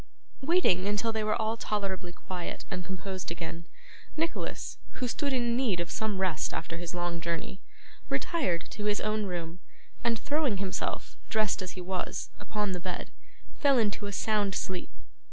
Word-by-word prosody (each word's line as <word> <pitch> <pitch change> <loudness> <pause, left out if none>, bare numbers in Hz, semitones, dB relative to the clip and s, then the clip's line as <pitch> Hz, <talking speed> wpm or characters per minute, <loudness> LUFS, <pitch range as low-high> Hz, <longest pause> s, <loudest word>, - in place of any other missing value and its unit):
Waiting 265 - +4
until 205 +3 +2
they 220 -1 0
were 215 +2 +2
all 220 0 +2
tolerably 195 -5 -1
quiet 180 0 -5
and 180 - -1
composed 190 0 -3
again, 170 0 -4 0.5
Nicholas, 330 +1 -1
who 255 - -1
stood 280 +4 0
in 240 -2 +3
need 235 -8 +3
of 170 - -1
some 215 -3 0
rest 185 -5 +1
after 165 +1 -3
his 175 0 -4
long 175 -1 0
journey, 170 +3 -2 0.5
retired 185 - +1
to 210 - -3
his 210 0 +3
own 215 -1 +1
room, 175 -1 -3 0.4
and 230 -1 +3
throwing 285 -5 +2
himself, 195 0 -1
dressed 215 -3 +3
as 185 - -3
he 185 - -5
was, 180 0 -2
upon 210 -2 0
the 180 - -1
bed, 180 0 -3 0.5
fell 280 -3 +6
into 210 -2 +2
a - - -2
sound 205 -1 +2
sleep. 185 -1 -1
195 Hz, 165 wpm, -31 LUFS, 180-220 Hz, 0.5 s, fell